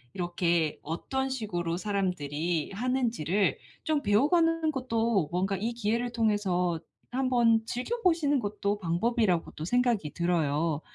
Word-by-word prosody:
이렇게 175 -3 0
어떤 265 - -2
식으로 175 -9 -2
사람들이 175 -5 -1
하는지를 225 - 0 0.3
좀 310 -2 +1
배워가는 320 - +3
것도 230 - 0
뭔가 190 +2 0
이 225 +5 -2
기회를 235 +2 -1
통해서 190 -7 +1 0.3
한번 240 -3 +3
즐겨보시는 325 - +1
것도 205 -1 -2
방법이라고 185 +1 +1
또 155 - -5
생각이 235 - +1
들어요. 160 -3 0
205 Hz, 290 characters per minute, -29 LUFS, 175-245 Hz, 0.3 s, 배워가는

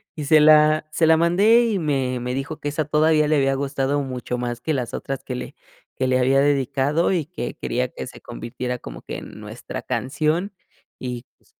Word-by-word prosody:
y 150 - -5
se 155 +2 +6
la 155 0 +5
se 160 +1 +2
la 160 0 +6
mandé, 200 +8 +4
y 215 -5 0
me 135 -5 -1
me 125 +1 -3
dijo 150 +4 -4
que 145 - -3
esa 150 0 -2
todavía 155 0 +3
le 155 - +3
había 135 -1 +2
gustado 140 +1 -1
mucho 125 -2 -4
más 120 -1 -4
que 160 - -1
las 125 -4 -3
otras 135 -1 -4
que 125 - -5
le - - -7 0.4
que 130 - -1
le 130 0 +2
había 135 +2 +3
dedicado, 140 +4 +1
y 170 -5 0
que 155 -6 -6
quería 125 +1 -2
que - - -7
se - - -12
convirtiera 125 - -5
como - - -9
que - - -6
en - - -10
nuestra - - -7
canción. 155 +9 -1 0.5
Y 125 -1 -5
pues - - -34
140 Hz, 205 wpm, -22 LUFS, 130-155 Hz, 0.5 s, se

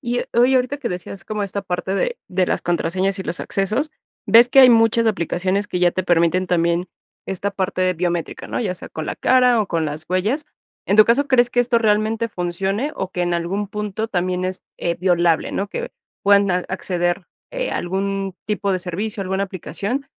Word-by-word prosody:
Y, 245 -2 -2
eh, - - -6
oye, 245 +3 +5
ahorita 255 +2 0
que - - -3
decías 180 +2 -6
como 215 -1 -3
esta 200 0 -3
parte 185 +1 -3
de 475 - -1
de 185 0 +1
las - - -1
contraseñas 185 +3 0
y - - -3
los 175 -1 -2
accesos, 215 +10 -1 0.4
ves 235 +2 +7
que 270 - +6
hay 255 - +9
muchas 225 0 +4
aplicaciones 190 0 0
que 180 - -2
ya 175 -1 +4
te 185 - -2
permiten 175 +1 +2
también 170 0 +1 0.4
esta 195 +1 -2
parte 190 -1 -2
de 185 0 +2
biométrica, 175 -1 -3
¿no? - - -2
Ya 190 -5 -1
sea - - -10
con 155 -1 -6
la - - -4
cara 250 -3 +4
o 210 - -1
con 165 -2 0
las 150 +1 -5
huellas. 210 - 0 0.4
En 200 - +2
tu 215 - +9
caso, 255 +6 +2
¿crees 245 -2 +4
que 245 - +2
esto 240 -1 +2
realmente 220 +1 +1
funcione 195 - -2
o 190 0 -3
que 180 - -1
en 175 0 0
algún 190 +4 -2
punto 210 +1 -4
también 180 -2 -1
es, 185 0 -3 0.2
eh, 170 -1 -1
violable, 175 -3 +2
¿no? 200 - -2
Que - - -5 0.3
puedan 200 -1 +4
a 180 - +2
acceder, 175 -1 -2 0.3
eh, - - -2
algún 195 +1 -2
tipo 205 -1 -1
de 185 - 0
servicio, 195 +4 -4
alguna 190 +1 -1
aplicación, 200 - -4
195 Hz, 205 wpm, -21 LUFS, 180-220 Hz, 0.4 s, hay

